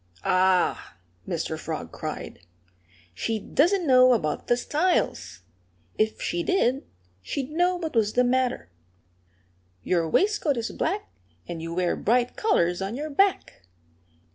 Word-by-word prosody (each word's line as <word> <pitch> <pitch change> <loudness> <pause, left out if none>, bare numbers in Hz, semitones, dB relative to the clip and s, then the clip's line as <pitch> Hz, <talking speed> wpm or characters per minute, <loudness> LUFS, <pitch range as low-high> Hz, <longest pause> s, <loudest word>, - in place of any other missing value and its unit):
"Ah!" 185 - +1 0.3
Mr. - - -3
Frog - - -5
cried. - - -6 0.7
"She 220 - -2
doesn't 345 - +1
know 255 -2 +6
about 155 -10 -2
the 240 - +3
styles. 270 - -1 0.5
If 215 0 0
she 175 - -2
did, 270 - 0 0.3
she'd 265 - -4
know 355 +3 +2
what 325 -6 -5
was 215 -2 +2
the 250 - +3
matter. 250 - 0 1.1
Your 170 +1 0
waistcoat 380 - +1
is 230 -1 -3
black; 395 +5 -2 0.4
and 165 -2 -6
you 165 +1 -5
wear 180 -1 +1
bright 245 +3 +1
colors 175 - +1
on 195 +4 -3
your 300 +3 -5
back. 355 - 0
245 Hz, 130 wpm, -25 LUFS, -, 1.1 s, know